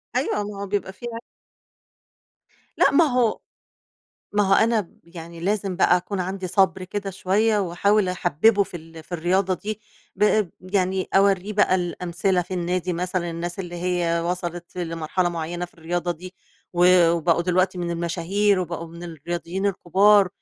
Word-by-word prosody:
أيوه. 230 -5 0
ما 205 -1 -7
هو 200 - -4
بيبقى 195 -1 -2
فيها 230 +1 -7 1.6
لأ، - - +5
ما 320 +3 +5
هو 245 -5 +1 0.9
ما 205 0 +3
هو 195 - +5
أنا 225 +1 +3
ب 175 - -12
يعني 170 -1 -10
لازم 195 0 -1
بقى 180 -1 +4
أكون 185 +2 -3
عندي 185 +1 -3
صَبْر 190 0 +2
كده 195 +1 -4
شوية 205 +3 +1
وأحاول 195 +2 +2
أحبِّبُه 190 +4 +3
في 180 - -7
ال 165 0 -12
في 175 - -17
الرياضة 185 +3 +1
دي، 215 +4 -6 0.4
ب 210 -2 +3
يعني 185 0 -1
أورّيه 195 +1 +3
بقى 205 -2 +3
الأمثلة 180 +1 0
في 185 +2 -6
النادي 180 +1 -1
مثلًا، 175 0 -2
الناس 170 +2 -5
اللي 175 -2 -5
هي 175 -1 0
وصَلت 175 0 -4
لمرحلة 165 +1 -1
معيّنة 175 +1 -4
في 175 - -13
الرياضة 175 +2 -3
دي 180 +3 -11 0.4
و 175 -1 +5
وبقوا 170 0 +2
دلوقتي 185 +1 +1
من 175 -1 -2
المشاهير 180 +4 +1
وبقوا 170 -1 -4
من 170 +1 -11
الرياضيين 170 +3 -4
الكُبار 200 +1 +4
180 Hz, 155 wpm, -23 LUFS, 170-200 Hz, 1.6 s, لأ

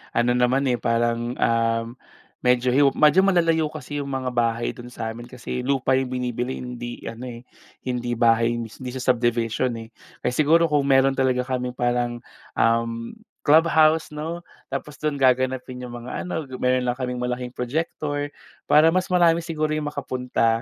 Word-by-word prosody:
ano 120 +1 +3
naman 125 +2 +2
eh 120 - 0
parang, 120 0 0
um, 115 0 +1 0.6
medyo 125 0 +3
hiw 140 +2 +4
medyo 155 +6 +5
malalayo 165 -4 +3
kasi 150 -1 -6
'yong 140 - -6
mga 130 -2 -2
bahay 115 -1 0
do'n 120 0 -11
sa'min 115 +1 -5
kasi 125 0 -5
lupa 135 -1 +1
'yong 130 -1 -1
binibili, 125 0 -2
hindi 120 -1 -7
ano 115 +2 -8
eh, 120 -1 -8 0.4
hindi 120 -1 -2
bahay, 115 0 +3
hindi 115 -2 -5 0.2
siya 130 - -5
subdivision 120 0 0
eh, 115 - -11 0.3
kaya 125 - 0
siguro 155 +5 +4
kung 145 -2 +2
meron 135 0 +4
talaga 130 -1 +2
kaming 125 -1 -2
parang, 120 -1 -1 0.3
um, 115 0 0 0.3
clubhouse, 160 +1 +4
'no, 160 +3 -5 0.3
tapos 145 +2 -5
do'n 150 -2 -2
gaganapin 130 0 +1
'yong 125 -1 -7
mga - - -5
ano, 160 -3 -3
meron 125 0 +2
lang 125 0 -1
kaming 125 -1 -3
malaking 125 0 -2
projector 145 +2 -2 0.4
para 155 +2 +6
mas 185 0 +1
marami 170 -2 +4
siguro 155 -2 -2
'yung 155 -1 -2
makapunta, 125 -5 -1
125 Hz, 160 wpm, -23 LUFS, 120-145 Hz, 0.6 s, para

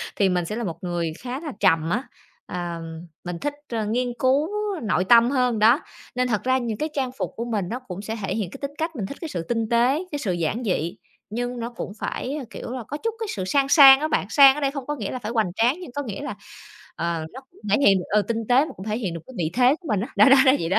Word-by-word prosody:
thì 195 -2 +3
mình 180 -1 0
sẽ 210 - -4
là 235 - -3
một 170 -6 -4
người 170 -2 -2
khá 255 +2 -5
là 305 -3 -6
trầm 165 -3 +3
á. 245 +9 0 0.4
Ờm, 170 -1 -6 0.2
mình 175 -1 -5
thích, 290 0 -2 0.2
à, 225 -2 -2
nghiên 245 +3 -1
cứu 270 +4 +3 0.4
nội 190 -3 +1
tâm 235 +2 +6
hơn 250 -4 +1
đó, 230 +6 +5 0.3
nên 250 0 +1
thật 215 -4 -1
ra 260 +1 +2
những 235 -4 -3
cái 310 - -2
trang 265 -3 -1
phục - - -3
của 230 - -4
mình 215 -5 -1
nó 245 - -3
cũng 200 -7 -8
sẽ 220 +2 -4
thể - - -2
hiện 205 -6 -2
cái - - -8
tính 280 0 -3
cách, 320 0 -3
mình 215 -7 -3
thích 280 - -7
cái 330 - -5
sự 170 - -4
tinh 230 -2 -1
tế, 250 +8 +2
cái 290 - -3
sự 205 - -1
giản 175 +8 -2
dị, 175 -6 -1 0.3
nhưng 245 +3 -3
nó 235 +1 -3
cũng 230 -4 -6
phải, 270 +4 -3
a, 295 - -4
kiểu - - -7
là, 255 -2 -5
có 290 - -4
chút 455 +8 -2
cái 445 - -3
sự 190 -3 -3
sang 275 +7 +1
sang 270 -3 +9
á 305 - 0
bạn. 250 - 0
Sang 275 0 +7
ở 295 - -5
đây 275 - +1
không 275 -3 -6
có 295 - -2
nghĩa 215 -8 -4
là 255 - -4
phải 215 -1 -5
hoành 220 -7 0
tráng, 240 +7 +3
nhưng 355 - -9
có 285 +3 -3
nghĩa 215 -4 -6
là, 295 - -5 0.6
ờ, 170 -2 -2
nó 265 - -9
cũng - - -22
thể 205 - +5
hiện 195 -1 +6
được, 180 - -5
ừ, 210 0 +3
tinh 230 -1 -1
tế 255 +4 +5
mà 315 - -8
cũng 190 - -9
thể 215 +1 -1
hiện 190 -8 -3
được 170 - -6
cái 260 - -12
vị 160 -2 0
thế 255 +3 +4
của 340 - -10
mình 210 -5 +1
á, 230 - -3
đó - - +7
đó 270 - +8
đó 260 - +8
vậy 165 - -2
đó. 185 - +3
235 Hz, 290 wpm, -24 LUFS, 190-270 Hz, 0.6 s, sang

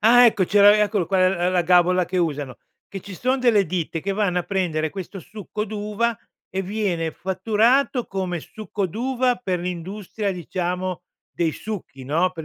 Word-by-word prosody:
ah 245 +3 +7
ecco! 215 -5 +4
C'era 205 +2 +6
eccolo 205 -3 +1
qua 185 0 +3
l 180 -1 0
la 180 -1 +2
gabola 180 +1 +4
che 180 +2 -4
usano, 145 -7 -1 0.3
che 195 -2 -7
ci 200 - -9
son 255 +2 0
delle 220 -7 +4
ditte 170 0 -2
che 195 +4 -2
vanno 195 -3 +1
a 175 - -2
prendere 170 -5 -1
questo 195 +1 -7
succo 210 +3 -6
d'uva 215 +2 -2 0.3
e 190 +1 -3
viene 185 -5 -1
fatturato 225 - +1
come 185 -2 -3
succo 205 +3 -4
d'uva 250 +6 0
per 195 -7 -2
l'industria, 185 +4 -4
diciamo, 180 0 -3 0.3
dei 170 -2 0
succhi, 170 -8 -7
no, 165 +7 +1
per 165 -3 -8
190 Hz, 170 wpm, -23 LUFS, 175-210 Hz, 0.3 s, ah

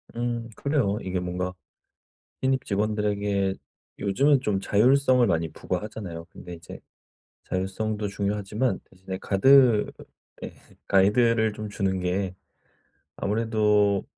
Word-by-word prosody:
음 120 -1 -3
그래요. 135 -9 0
이게 95 -1 -2
뭔가 90 +1 -3 0.9
신입 130 0 +1
직원들에게 105 -1 0 0.5
요즘은 135 +8 +3
좀 105 -6 -1
자율성을 125 +5 +4
많이 85 -4 0
부과하잖아요. 90 -2 -5
근데 90 +1 -10
이제 80 -1 -11 0.6
자율성도 105 +3 -2
중요하지만 105 +4 -2
대신에 95 0 -8
가드 120 +2 +4 0.5
예 - - -7 0.3
가이드를 110 +3 +3
좀 105 0 -6
주는 95 -2 -1
게 90 +1 -1 0.8
아무래도 105 -2 +1
105 Hz, 265 characters per minute, -25 LUFS, 95-115 Hz, 0.9 s, 자율성을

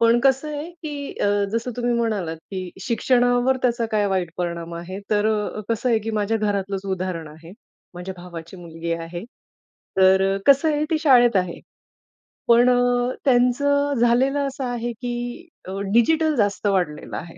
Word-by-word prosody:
पण 230 +1 +5
कसं 270 +2 +3
आहे, 300 +4 -6
की 300 -4 -6
अ, - - +2 0.3
जसं 230 +2 -1
तुम्ही 245 0 0
म्हणालात, 210 -8 -1
की 185 -2 -5
शिक्षणावर 245 +1 +2
त्याचा 240 -2 +1
काय 210 -1 +2
वाईट 185 -3 -1
परिणाम 170 -1 -4
आहे? 175 +3 -6
तर 210 0 +2
अ, 215 -1 -1
कसं 230 +2 0
आहे, 225 - +3
की 220 +1 -5
माझ्या 215 0 0
घरातलंच 200 -2 -2
उदाहरण 180 -4 -4
आहे, 160 +3 -13 0.4
माझ्या 180 +2 -6
भावाची 170 0 -9
मुलगी 170 -1 -5
आहे. 165 +2 -5 0.7
तर 190 0 +5
अ, - - -3
कसं 280 +3 +5
आहे 295 0 0
ती 320 - +2
शाळेत 245 - +5
आहे. 180 -2 -1 0.9
पण 240 +1 +6
अ, 245 0 +2
त्यांचं 285 +3 +3
झालेलं 255 +4 +3
असं 270 0 -5
आहे, 240 -1 -3
की 245 +7 -5 0.2
अ, 190 +1 -5
डिजिटल 310 +7 +3
जास्त 205 -4 0
वाढलेलं 175 -7 -1
आहे. 165 0 -9
225 Hz, 160 wpm, -22 LUFS, 185-250 Hz, 0.9 s, पण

